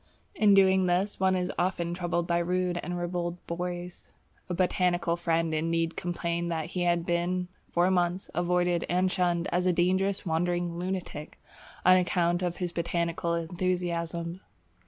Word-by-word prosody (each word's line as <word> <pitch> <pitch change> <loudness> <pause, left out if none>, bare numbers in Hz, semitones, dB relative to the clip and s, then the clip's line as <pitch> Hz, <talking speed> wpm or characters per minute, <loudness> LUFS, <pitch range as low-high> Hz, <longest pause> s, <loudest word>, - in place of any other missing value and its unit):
In 210 - +5
doing 190 -1 +5
this, 185 +4 0
one 190 0 +3
is 180 -1 -1
often 175 -1 0
troubled 175 -1 -1
by 170 0 +1
rude 180 0 0
and 175 0 -4
ribald 175 0 -2
boys. 175 +1 -5 0.4
A 180 - -1
botanical 175 -1 +1
friend 165 -1 0
indeed 165 +1 0
complained 170 -1 -2
that 160 -2 -1
he 180 - -2
had 175 -1 +1
been 175 +1 0 0.2
for 175 +2 +3
months 180 +1 0
avoided 175 0 +1
and 185 +1 +2
shunned 175 -1 +1
as 180 +1 +1
a - - +5
dangerous 185 +3 +1
wandering 175 +1 -1
lunatic 180 -4 -5 0.5
on 185 0 +8
account 175 -1 +1
of 175 -1 -2
his 180 -2 -2
botanical 170 0 -1
enthusiasm. 170 0 -2
175 Hz, 150 wpm, -28 LUFS, 170-180 Hz, 0.5 s, on